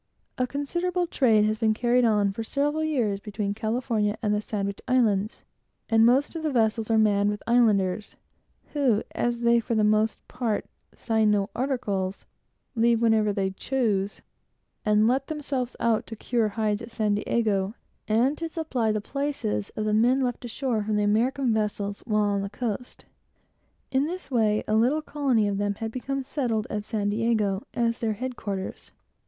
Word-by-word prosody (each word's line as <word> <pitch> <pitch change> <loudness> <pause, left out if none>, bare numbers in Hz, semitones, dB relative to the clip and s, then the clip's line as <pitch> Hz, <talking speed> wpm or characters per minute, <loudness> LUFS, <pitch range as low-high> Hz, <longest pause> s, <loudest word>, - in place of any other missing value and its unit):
A 255 - +1
considerable 345 +6 -1
trade 225 -10 +3
has 215 0 0
been 220 -2 +2
carried 245 +2 +2
on 210 -3 +3
for 225 - -4
several 290 +6 0
years 240 -11 0
between 205 -1 -3
California 220 -1 -1
and 210 -1 +2
the 210 - 0
Sandwich 200 -2 -3
Islands, 215 -5 +1 0.5
and 225 0 +5
most 270 +7 +2
of 325 - -3
the 310 -1 -1
vessels 225 -2 +1
are 225 - +3
manned 205 -2 +3
with 205 0 -4
Islanders; 215 -4 +2 0.6
who, 260 -8 +2
as 240 0 -1
they, 235 0 +4
for 230 0 -2
the 215 - +3
most 215 +1 +1
part, 240 -4 -2 0.3
sign 220 -2 +1
no 205 -1 +1
articles, 205 -8 -2 0.5
leave 230 -1 +3
whenever 220 -2 +3
they 195 -1 -1
choose, 205 -2 -1 0.6
and 210 +1 +3
let 265 +3 +1
themselves 275 -5 -3
out 230 -2 +1
to 225 - -7
cure 230 +1 0
hides 210 0 -1
at 230 - -8
San 215 -3 0
Diego, 210 -1 0 0.3
and 245 +7 +2
to 330 0 -3
supply 270 -9 -1
the 215 -1 -1
places 275 - -2
of 215 - -2
the 215 - +1
men 245 +5 +3
of 245 -2 0
the 220 -4 -1
American 235 +4 +2
vessels 205 -2 -2
while 210 -2 +2
on 200 -1 +1
the 200 - -4
coast. 235 +2 -5 0.9
In 270 +2 +2
this 360 -3 -6
way, 215 -3 +2
quite 220 +4 +3
a 310 - -1
colony 270 -9 +1
of 200 -1 -1
them 205 0 0
had 225 +2 -4
become 270 +3 -3
settled 245 -6 -1
at 210 -1 -2
San 210 -2 -1
Diego, 215 -3 +1
as 235 -1 0
their 220 -2 0
headquarters. 210 -5 -5
225 Hz, 170 wpm, -26 LUFS, 210-250 Hz, 0.9 s, and